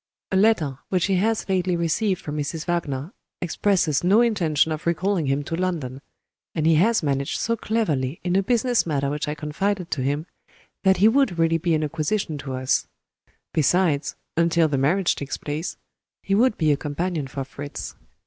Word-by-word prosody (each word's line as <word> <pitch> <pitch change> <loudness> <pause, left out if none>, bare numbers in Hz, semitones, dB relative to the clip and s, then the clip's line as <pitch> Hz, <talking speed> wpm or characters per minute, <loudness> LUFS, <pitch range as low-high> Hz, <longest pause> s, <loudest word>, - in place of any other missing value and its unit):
A - - +1
letter 180 - +2
which 180 -2 +1
he 195 -2 +1
has 220 +4 0
lately 185 -2 +1
received 180 +3 0
from 150 - -5
Mrs. 150 +2 -3
Wagner 160 - -2 0.3
expresses 175 -4 +1
no 200 +6 +5
intention 165 -10 +2
of 155 +1 -4
recalling 175 -1 +1
him 135 +2 0
to 165 - -3
London 160 -8 -3 0.5
and 155 -2 0
he 165 - +5
has 210 +6 +3
managed 140 -1 -1
so 230 - 0
cleverly 165 - -1
in 180 0 0
a 195 - +4
business 240 0 +1
matter 140 -3 0
which 150 0 -3
I 150 - -2
confided 175 +5 -2
to 135 - -1
him, 145 +4 -1 0.6
that 190 -1 +4
he 205 - +6
would 235 -6 +3
really 165 0 +2
be 170 0 +1
an 155 - 0
acquisition 155 +1 -2
to 135 -2 -5
us. 130 0 0 0.7
Besides 155 -2 +2 0.2
(until 170 0 +3
the 140 -3 0
marriage 170 +7 +2
takes 140 0 -4
place), 150 +3 -4 0.5
he 195 - -1
would 235 +3 +3
be 155 -2 +3
a 145 - +2
companion 155 +1 -3
for 135 +1 -4
Fritz." 140 +2 -7
165 Hz, 180 wpm, -24 LUFS, 145-190 Hz, 0.7 s, he